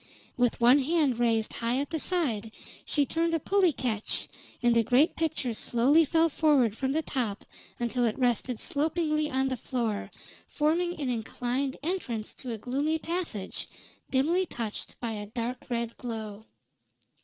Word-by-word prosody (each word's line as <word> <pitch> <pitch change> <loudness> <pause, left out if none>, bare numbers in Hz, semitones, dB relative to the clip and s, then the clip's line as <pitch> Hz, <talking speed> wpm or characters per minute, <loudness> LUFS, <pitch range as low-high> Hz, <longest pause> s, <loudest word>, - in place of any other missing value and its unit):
With 245 -1 +1
one 245 +4 +6
hand 285 -4 +1
raised 225 -2 +1
high 235 +2 0
at 280 +1 -2
the 320 - -1
side, 245 - 0 0.3
she 290 -2 +2
turned 330 +3 0
a - - +1
pulley 385 +2 +3
catch, 230 -6 -1 0.4
and 240 -1 +4
the 230 - +6
great 250 +8 +3
picture 315 -7 -1
slowly 260 +9 +3
fell 325 +2 +3
forward 280 -8 +3
from 265 +2 -1
the 320 +1 0
top 230 -9 -2 0.3
until 240 +1 0
it 220 - 0
rested 245 -1 +1
slopingly 305 0 0
on 265 +1 +1
the 260 -1 -2
floor, 230 -4 -2 0.4
forming 335 +3 0
an 275 -3 -1
inclined 245 +3 -2
entrance 260 - -3
to 255 - -7
a 225 - -3
gloomy 280 +8 0
passage, 325 - -3 0.4
dimly 335 +8 +2
touched 225 -6 -5
by 235 -2 -3
a 210 -1 -5
dark 240 +3 -4
red 235 -1 -2
glow. 220 -3 -6
255 Hz, 155 wpm, -28 LUFS, 230-310 Hz, 0.4 s, one